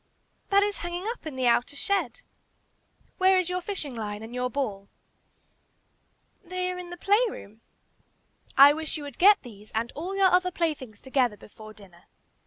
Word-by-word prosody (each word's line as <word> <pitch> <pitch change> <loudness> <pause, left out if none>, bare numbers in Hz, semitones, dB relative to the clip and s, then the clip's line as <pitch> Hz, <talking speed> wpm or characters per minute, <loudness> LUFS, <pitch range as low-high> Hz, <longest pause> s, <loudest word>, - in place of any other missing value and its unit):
"That 400 0 +5
is 410 0 -2
hanging 345 +1 -4
up 460 -6 -5
in 295 - -6
the 260 -1 -1
outer 240 +3 +2
shed." 400 - -1 1.0
"Where 375 0 +5
is 365 -1 0
your 365 0 -1
fishing 350 -8 -5
line 210 -1 -5
and 225 +2 -9
your 250 0 -1
ball?" 210 -8 -4 1.5
"They 365 0 -3
are 360 - -6
in 355 -1 -8
the 350 - -8
play 405 +5 +3
room." 220 - -11 1.0
"I 280 +1 +9
wish 315 +1 -4
you 300 - -7
would 285 -3 -9
get 400 +3 +6
these 215 -4 -13
and 230 +2 -1
all 360 +6 -5
your 385 -2 +5
other 365 0 +3
playthings 295 - -3
together 255 -5 +1
before 215 +1 -13
dinner. 185 -5 -17
295 Hz, 175 wpm, -27 LUFS, 230-365 Hz, 1.5 s, I